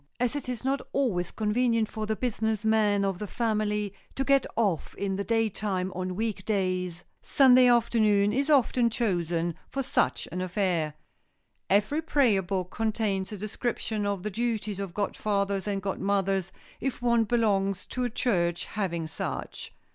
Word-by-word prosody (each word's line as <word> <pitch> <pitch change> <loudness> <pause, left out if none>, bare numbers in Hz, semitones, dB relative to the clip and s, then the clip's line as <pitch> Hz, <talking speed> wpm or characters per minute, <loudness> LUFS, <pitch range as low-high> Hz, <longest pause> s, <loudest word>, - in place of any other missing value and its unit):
As 250 +2 +1
it 285 -3 -4
is 250 0 -4
not 275 +1 +1
always 195 -11 0
convenient 230 +1 +1
for 215 0 -5
the 220 - 0
business 220 -2 -1
men 210 -2 +3
of 195 -2 -1
the 210 - -4
family 210 -2 -1 0.2
to 270 - 0
get 275 0 +3
off 200 -8 0
in 195 -1 -2
the 200 - -2
daytime 210 -4 0
on 185 0 -3
week 215 -2 -2
days, 185 -4 -1 0.2
Sunday 255 -2 +6
afternoon 215 -4 +3
is 275 +5 0
often 250 -4 +4
chosen 175 -7 0 0.2
for 275 - -2
such - - 0
an 180 - -3
affair. 180 -5 0 0.7
Every 210 +11 +2
prayer 265 -11 +3
book 185 -1 -3
contains 215 -3 -1
a 210 - -5
description 215 0 -2
of 200 -3 -2
the 210 - -3
duties 215 -2 -2
of 195 -3 -5
godfathers 200 -1 -1
and 200 -2 -2
godmothers, 195 -1 0 0.3
if 270 -1 -2
one 235 -1 +4
belongs 195 -4 +1
to 255 - -2
a 245 - 0
church 175 -8 0
having 170 -6 -2
such. 160 - -5
210 Hz, 155 wpm, -28 LUFS, 190-230 Hz, 0.7 s, Sunday